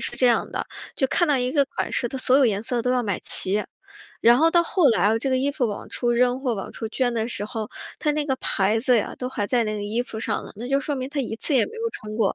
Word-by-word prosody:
是 - - -4
这 255 - +3
样 230 - +2
的， - - -3 0.3
就 - - +1
看 345 - +2
到 290 - +4
一 250 0 0
个 285 -3 +4
款 - - -3
式 240 - 0
她 265 - -5
所 255 0 +3
有 265 - +5
颜 205 -1 0
色 240 +1 -1
都 250 - 0
要 250 -1 +1
买 200 -5 -2
齐。 205 +3 0 0.6
然 235 +2 +6
后 325 +1 +5
到 340 0 +4
后 335 -3 +3
来， 220 0 +3
这 270 - -2
个 260 - +2
衣 270 +2 +1
服 275 -4 0
往 205 - -6
出 240 -1 0
扔， 250 +1 +2
或 255 -4 0
往 195 - -6
出 225 - -5
捐 245 +1 0
的 225 -1 -1
时 205 - -2
候， 215 -1 -5 0.3
它 300 - +1
那 300 0 0
个 265 -3 0
牌 210 -2 +1
子 250 0 +3
呀， 215 - -1
都 250 - -3
还 205 -5 -2
在 240 +1 +2
那 215 0 -2
个 205 - -4
衣 210 +3 -1
服 220 - -8
上 220 -2 -2
呢， - - -10
那 235 +3 -6
就 275 +1 +3
说 290 +1 -2
明 260 -1 -4
她 285 -2 -1
一 230 -3 -3
次 285 - 0
也 250 - +5
没 - - -11
有 455 0 -2
穿 215 - -8
过。 210 -4 +1
245 Hz, 320 characters per minute, -24 LUFS, 220-270 Hz, 0.6 s, 然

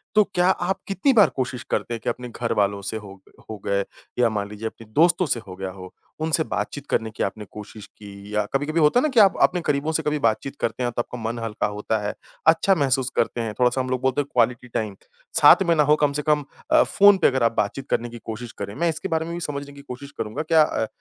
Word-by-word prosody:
तो 210 - +7
क्या 180 0 +3
आप 190 0 0
कितनी 195 +7 +2
बार 210 - +6
कोशिश 125 -2 -3
करते 120 - -1
हैं 115 - -4
कि - - 0
अपने 125 +1 -5
घर 115 0 -2
वालों 100 -1 +1
से 100 +3 -4
हो 100 -3 -10
ग - - -21 0.2
हो 110 - -5
गए 100 0 +1 0.4
या 120 -2 +4
मान 100 -2 -3
लीजिए 105 +2 -5
अपने 115 +1 -10
दोस्तों 175 +5 +4
से 130 -6 0
हो 95 - -8
गया 95 0 -5
हो, 95 -1 -11 0.3
उनसे 160 0 +1
बातचीत 145 -2 -4
करने 110 - 0
की - - -3
आपने 105 +2 -4
कोशिश 105 0 -10
की? 100 0 -11
या 105 -1 +1
कभी-कभी 145 +4 0
होता 150 +9 +5
है - - 0
ना 310 - +2
कि 255 -5 +3
आप 200 -3 +6
अपने 180 -1 +3
करीबों 145 +2 0
से 160 0 -1
कभी 150 0 0
बातचीत 115 +3 0
करते 125 - -2
हैं, 120 - 0
तो 120 - -1
आपका 125 - -8
मन 120 - -6
हल्का 110 -2 -1
होता 105 +2 -2
है, - - -2 0.3
अच्छा 165 +4 +5
महसूस 135 -4 +1
करते 120 +1 0
हैं, 110 -2 -3
थोड़ा-सा 125 +1 +3
हम 130 - -4
लोग 130 -1 -1
बोलते 130 +2 +1
हैं 145 - -7
क्वालिटी 120 +1 +1
टाइम, 110 -4 -3 0.5
साथ 195 - +8
में 170 - +5
ना 150 - +4
हो 150 +1 +4
कम 145 -1 +3
से - - 0
कम 150 0 +1 0.3
अ, - - +6
फ़ोन 200 0 +5
पे - - +4
अगर 130 -2 +1
आप 115 - +4
बातचीत 130 +6 -2
करने 120 +1 0
की 120 - -9
कोशिश 115 +1 -6
करें। 100 +1 -6
मैं 170 +2 +1
इसके 160 0 -3
बारे 160 0 0
में 170 - -5
भी 170 - -4
समझने 145 -1 -6
की 140 - -12
कोशिश 140 +1 -9
करूँगा, 110 +6 -3
क्या 160 0 +4
अ, 110 -6 -1
125 Hz, 265 wpm, -23 LUFS, 110-155 Hz, 0.5 s, साथ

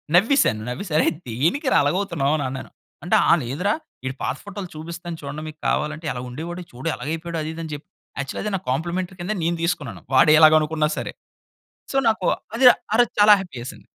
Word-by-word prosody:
నవ్వేశాను. 195 - +4
నవ్వేసి, 170 +9 -5
"అరే! - - +3 0.2
దేనికిరా 165 - +1
అలాగవుతున్నావనన్నాను." 145 -5 -1 0.3
అంటే 175 - +2
ఆహ్, 170 - +6
"లేదురా, 155 - -1 0.3
ఈడి 130 0 -3
పాత - - -1
ఫోటోలు 200 -2 -7
చూపిస్తాను 170 +2 -7
చూడండి 145 +2 -6
మీకు 155 0 -10
కావాలంటే, 155 +2 -1
ఎలగుండేవోడో 150 +9 -6
చూడు 130 +6 -7
ఎలాగయిపోయాడో," 165 +5 -4
అది 155 - -4
ఇది 165 - -7
అని 160 - -7
చెప్ 145 - -7 0.3
యాక్చల్‌గాది 140 +9 -3
నాకు 190 - -5
కాంప్లిమెంటరీ 175 +6 -2
కింద 205 +5 -2
నేను 170 +1 0
తీసుకున్నాను. 170 -6 -2
వాడు 150 - +6
ఎలాగనుకున్నా 155 -1 +5
సరే. - - -4 0.8
సో, 270 - -2
నాకు 215 -4 0 0.3
అది 250 +3 +1 0.3
ఆ 220 - +4
రోజు 240 - +3
చాలా 210 0 +9
హ్యాపీ 180 -8 -9
యేసింది. 125 - -9
160 Hz, 165 wpm, -23 LUFS, 145-180 Hz, 0.8 s, చాలా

